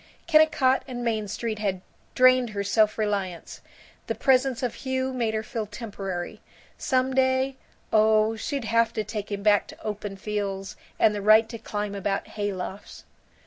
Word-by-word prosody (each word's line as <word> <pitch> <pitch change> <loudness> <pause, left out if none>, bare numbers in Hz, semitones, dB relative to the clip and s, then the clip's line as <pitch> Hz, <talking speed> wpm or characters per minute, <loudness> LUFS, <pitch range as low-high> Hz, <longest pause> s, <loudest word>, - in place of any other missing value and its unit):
Kennicott 310 -5 +4
and 245 -2 -5
Main 220 -3 -1
Street 215 +1 -4
had 195 -3 -1 0.4
drained 255 -1 +5
her 200 - 0
self 215 +1 +2
reliance; 200 -5 -3 0.5
the - - -1
presence 260 -1 +2
of 245 - -1
Hugh 260 0 -2
made 230 -3 -1
her 220 - -1
feel 220 -1 -4
temporary. 195 -6 -6 0.3
Some 260 0 0
day 260 0 +2 0.4
oh, 215 0 +4
she'd 270 +3 -3
have 230 +1 +2
to 215 - -1
take 210 -1 -6
him 200 0 -3
back 205 -1 +4
to - - -13
open 205 -2 -5
fields 195 -1 -4 0.2
and 215 - +4
the 205 - -3
right 215 +2 +6
to 230 - -7
climb 210 -2 -4
about 195 0 -2
hay 205 -1 -2
lofts. 190 +2 -7
215 Hz, 165 wpm, -26 LUFS, 205-255 Hz, 0.5 s, right